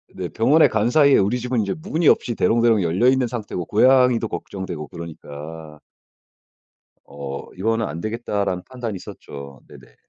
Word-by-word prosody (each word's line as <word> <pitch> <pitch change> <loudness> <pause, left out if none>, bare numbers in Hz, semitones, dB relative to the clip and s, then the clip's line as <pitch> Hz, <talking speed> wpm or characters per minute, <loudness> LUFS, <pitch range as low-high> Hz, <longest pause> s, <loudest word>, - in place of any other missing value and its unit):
네 90 -1 -4
병원에 150 +8 +4
간 110 +1 0
사이에 140 +1 +5
우리 105 +6 +1
집은 125 -1 -1
인제 100 -2 -2
문이 165 -2 0
없이 120 - +2
대롱대롱 115 -2 +3
열려 90 +8 +2
있는 130 -1 +3
상태고 105 -7 -5
고양이도 125 +1 +4
걱정되고 90 -8 -6
그러니까 80 -2 -9 1.3
어 70 -1 -8
'이거는 115 +4 0
안되겠다.'라는 100 +1 -3
판단이 120 -6 -6
섰죠. 70 -5 -10
네네. - - -16
105 Hz, 345 characters per minute, -22 LUFS, 85-120 Hz, 1.3 s, 사이에